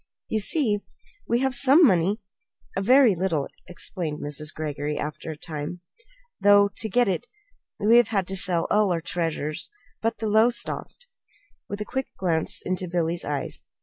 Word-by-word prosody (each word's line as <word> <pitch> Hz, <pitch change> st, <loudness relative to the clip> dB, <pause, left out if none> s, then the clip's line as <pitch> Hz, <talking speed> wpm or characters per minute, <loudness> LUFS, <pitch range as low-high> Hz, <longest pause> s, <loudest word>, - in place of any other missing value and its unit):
"You 220 Hz, -, 0 dB
see, 215 Hz, -1 st, +2 dB, 0.5 s
we 235 Hz, +1 st, +1 dB
have 265 Hz, -1 st, +1 dB
some 275 Hz, +6 st, +6 dB
money 190 Hz, -, +3 dB, 0.6 s
a 195 Hz, -, 0 dB
very 250 Hz, +1 st, +6 dB
little," 170 Hz, -5 st, -1 dB, 0.2 s
explained 170 Hz, -3 st, -4 dB
Mrs. 150 Hz, +1 st, -4 dB
Greggory, 150 Hz, -1 st, -4 dB
after 150 Hz, +2 st, -5 dB
a 155 Hz, -, -6 dB
time; 155 Hz, +2 st, -6 dB, 0.6 s
"though 205 Hz, 0 st, +6 dB
to 220 Hz, -, -1 dB
get 245 Hz, +3 st, +3 dB
it 185 Hz, -4 st, -2 dB, 0.5 s
we 220 Hz, +3 st, +5 dB
have 240 Hz, -3 st, +5 dB
had 200 Hz, -4 st, 0 dB
to 195 Hz, -, -3 dB
sell 180 Hz, -3 st, +1 dB
all 210 Hz, -2 st, +3 dB
our 170 Hz, -, +1 dB
treasures 160 Hz, -3 st, -2 dB, 0.3 s
but 225 Hz, +1 st, -1 dB
the 220 Hz, -, -4 dB
Lowestoft," 230 Hz, -, +1 dB, 0.6 s
with 205 Hz, +1 st, -5 dB
a -, -, -2 dB
quick 265 Hz, +3 st, -3 dB
glance 165 Hz, -4 st, +1 dB
into 185 Hz, 0 st, -2 dB
Billy's 170 Hz, 0 st, -1 dB
eyes. 145 Hz, -1 st, -3 dB
190 Hz, 160 wpm, -25 LUFS, 165-220 Hz, 0.6 s, some